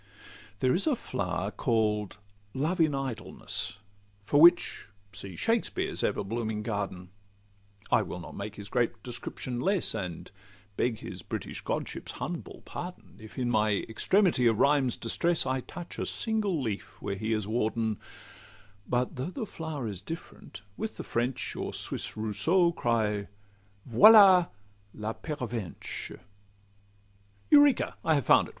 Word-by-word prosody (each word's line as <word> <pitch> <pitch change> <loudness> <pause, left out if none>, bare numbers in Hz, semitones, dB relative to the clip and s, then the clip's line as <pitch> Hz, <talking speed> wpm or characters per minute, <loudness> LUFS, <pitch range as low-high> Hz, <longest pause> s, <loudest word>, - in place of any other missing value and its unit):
There 130 -1 +3
is 190 - +1
a 300 - +3
flower 90 - -3
call'd 105 -2 0 0.4
'Love 160 +7 0
in 155 -3 +3
Idleness,' 130 -5 -3 0.5
For 145 +8 +4
which 175 +1 +5 0.3
see 95 -5 -8
Shakspeare's 230 - 0
everblooming 110 +1 -1
garden;— 100 -4 -4 0.8
I - - +5
will 90 - -5
not 85 - -9
make 105 +1 -6
his 100 -1 -8
great 115 -1 -1
description 120 0 -4
less, 195 +4 +1
And 90 -4 -5 0.4
beg 115 0 0
his - - -6
British - - -5
godship's - - -3
humble - - -6
pardon, 180 +1 -8
If 110 -1 -12
in 125 -2 0
my 110 -2 +3
extremity 165 - +3
of 115 -2 +3
rhyme's 140 -2 +3
distress, 170 +8 +1
I 130 0 0
touch 175 +6 -9
a - - -1
single 215 -6 0
leaf 110 -7 -4
where - - -3
he 110 +3 -3
is 110 -2 0
warden;— 110 -1 0 0.9
But 125 +1 0
though 130 +6 -2
the 225 +4 -4
flower 160 - -5
is 100 -4 -5
different, 135 -5 -9
with 220 - -4
the - - -5
French 120 +2 -2
Or - - -4
Swiss - - -4
Rousseau, 165 - +2
cry 110 -8 0 0.6
'Voila 185 - +8 0.5
la 110 +1 -3
Pervenche!' 120 - -5 1.3
Eureka! 290 -2 +5
I 160 - +3
have 140 -5 0
found - - +5
it! - - -11
120 Hz, 140 wpm, -29 LUFS, 105-165 Hz, 1.3 s, Voila